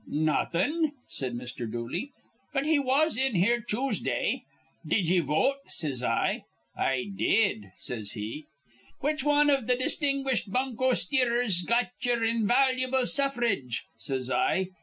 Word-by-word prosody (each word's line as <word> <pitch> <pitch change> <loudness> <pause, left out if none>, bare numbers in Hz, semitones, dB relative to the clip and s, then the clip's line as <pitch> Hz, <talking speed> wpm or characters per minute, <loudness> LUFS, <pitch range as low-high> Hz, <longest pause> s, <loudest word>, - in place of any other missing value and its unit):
"Nawthin'," 185 - 0
said 130 -3 -4
Mr. 120 -2 -6
Dooley, 125 - -4 0.4
"but 275 0 0
he 310 -1 +3
was 280 +3 +2
in 265 -3 +1
here 235 +7 +3
Choosday. 250 +6 -1 0.4
'Did 190 -6 +1
ye 180 +2 +4
vote?' 175 - +1
says 140 -6 -3
I. - - 0 0.3
'I 135 +9 -1
did,' 150 - +1
says 110 -4 -6
he. 115 +7 -6 0.5
'Which 300 0 0
wan 295 0 +4
iv 270 -5 +1
th' 250 - +3
distinguished 275 -5 0
bunko 255 +1 +1
steerers 245 -9 +1
got 235 +5 +2
ye'er 240 -1 +1
invalu'ble 255 +3 +2
suffrage?' 240 - 0
says 130 -2 -4
I. 185 +8 +1
235 Hz, 130 wpm, -28 LUFS, -, 0.5 s, ye